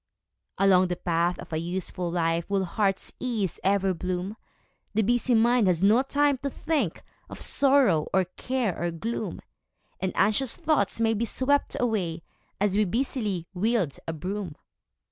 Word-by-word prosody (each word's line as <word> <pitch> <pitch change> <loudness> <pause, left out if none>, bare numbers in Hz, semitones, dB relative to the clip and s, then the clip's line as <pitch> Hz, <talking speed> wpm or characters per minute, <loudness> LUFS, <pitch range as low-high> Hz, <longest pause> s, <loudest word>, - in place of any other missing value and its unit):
Along 185 -2 +5
the 180 - -2
path 170 0 0
of - - -10
a - - 0
useful 175 +1 -2
life 170 0 0
Will 195 -1 +1
heart's 195 +1 -1
ease 220 -8 -2
ever 195 -1 +2
bloom; 180 +3 -3 0.6
The 220 - +3
busy 240 +3 +2
mind 235 -1 +4
has 180 -1 +1
no 215 +5 +5
time 280 0 +1
to 280 - -2
think 280 - -2 0.3
Of - - -9
sorrow, 265 - +3
or 190 -1 +2
care, 250 -8 -1
or 175 - 0
gloom; 215 +8 -4 0.6
And 190 - -1
anxious 215 +5 +3
thoughts 315 -8 +1
may 225 0 +3
be 225 +2 -1
swept 280 +5 +1
away 185 -9 -1 0.4
As 200 -1 +1
we 210 - +4
busily 210 -4 -2
wield 190 - 0
a 165 - -2
broom. 180 0 -5
200 Hz, 155 wpm, -26 LUFS, 180-240 Hz, 0.6 s, Along